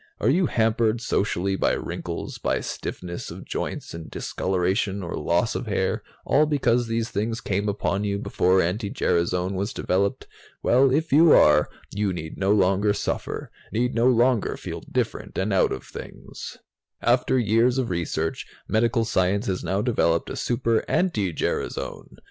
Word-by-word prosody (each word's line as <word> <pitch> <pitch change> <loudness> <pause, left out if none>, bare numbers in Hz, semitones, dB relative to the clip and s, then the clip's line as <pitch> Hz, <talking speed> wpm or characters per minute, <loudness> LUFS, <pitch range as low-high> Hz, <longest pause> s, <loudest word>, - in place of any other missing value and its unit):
Are - - +3
you 180 -2 +3
hampered 115 -1 +1
socially 100 -4 0
by - - +1
wrinkles, - - -5
by - - 0
stiffness 85 -1 -5
of - - -9
joints - - -4
and 85 -1 -8
discoloration 95 +2 -1
or 85 - -5
loss 85 +7 +1
of - - -4
hair, 95 -2 0 0.2
all 150 +2 +4
because 125 -5 +2
these 115 0 -2
things 115 +3 -1
came 100 +2 -1
upon 100 0 -1
you 100 -1 -1
before 95 -2 +2
anti 100 +5 -1
gerasone 90 +1 0
was 100 +6 -2
developed? 100 -2 0 0.4
Well, 130 +3 +5
if 160 +4 0
you 160 +2 +7
are, 75 0 +5 0.2
you 100 -2 -1
need 80 -2 -7
no 95 0 +2
longer 100 +1 +3
suffer, - - -3 0.2
need 125 +3 0
no 120 +1 +3
longer 120 -1 +2
feel - - -6
different - - -2
and 100 +2 0
out 95 - +3
of - - -4
things. - - -9 0.5
"After 125 +2 +3
years 120 +2 +3
of 125 -6 -1
research, 80 -2 -2 0.2
medical 115 +1 +2
science 100 +1 +1
has 95 -5 -2
now 95 +2 0
developed 85 -9 +1
Super 115 -2 0
anti 110 - +1
gerasone! - - -3
105 Hz, 155 wpm, -24 LUFS, 95-120 Hz, 0.5 s, you